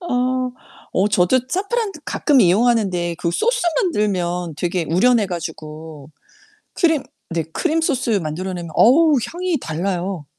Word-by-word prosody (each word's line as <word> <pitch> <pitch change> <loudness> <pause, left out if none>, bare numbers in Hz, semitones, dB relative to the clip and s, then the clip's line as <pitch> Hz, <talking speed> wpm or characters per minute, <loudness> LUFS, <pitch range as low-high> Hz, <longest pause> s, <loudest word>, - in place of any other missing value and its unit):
아. 255 -5 -1 0.4
어 195 +3 +2
저도 195 +7 +3
사프란 405 - -1
가끔 280 -4 +2
이용하는데 190 -4 +2
그 170 - -1
소스 475 - 0 0.2
만들면 180 - -1
되게 175 +1 -1
우려내 210 +5 +3
가지고 155 -4 -7 0.6
크림 320 -5 +2 0.3
네 165 -1 -1
크림소스 285 - 0
만들어 175 +5 -4
내면 170 -2 -6
어우 300 +6 +5
향이 350 -2 -2
달라요. 175 +1 -3
200 Hz, 270 characters per minute, -20 LUFS, 175-275 Hz, 0.6 s, 어우